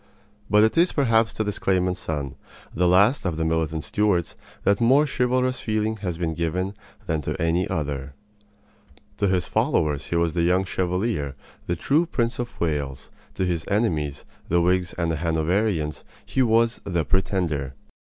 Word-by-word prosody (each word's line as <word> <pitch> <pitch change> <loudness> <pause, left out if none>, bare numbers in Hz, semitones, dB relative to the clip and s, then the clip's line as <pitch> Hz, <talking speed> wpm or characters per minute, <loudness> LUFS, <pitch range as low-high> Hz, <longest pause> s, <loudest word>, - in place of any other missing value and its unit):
But 105 0 +5
it 110 - +2
is 175 +2 +3
perhaps 115 -5 +3
to 110 - 0
this 105 -1 -3
claimant's 90 -1 +1
son, 70 -6 -3 0.4
the 90 +2 +2
last 100 +9 +4
of 85 -4 -2
the 80 - 0
militant 80 -1 -1
Stuarts, 100 -5 0 0.3
that 100 +2 +2
more 135 +6 +5
chivalrous 130 -1 0
feeling 110 0 -1
has 90 -5 -4
been 85 -2 -1
given 90 +4 -2 0.3
than 80 -1 -1
to - - -4
any 85 +2 +1
other. 70 -2 -3 1.0
To 100 - +1
his 95 -2 +1
followers 75 -3 0
he - - -2
was 85 -1 +1
the 85 - 0
Young 90 +3 +2
Chevalier, 90 - -1 0.3
the 85 - 0
true 150 - +1
Prince 120 -6 -1
of 120 0 -5
Wales; 75 -5 -2 0.2
to 95 - 0
his 85 -3 -1
enemies, 80 - 0 0.2
the 85 - +3
Whigs 90 0 +1
and 85 -1 0
the 80 - -1
Hanoverians, 80 +1 0 0.2
he 130 - 0
was 115 -1 +2
"the 85 -5 -1
Pretender." 85 -7 -1
90 Hz, 165 wpm, -24 LUFS, 80-110 Hz, 1.0 s, But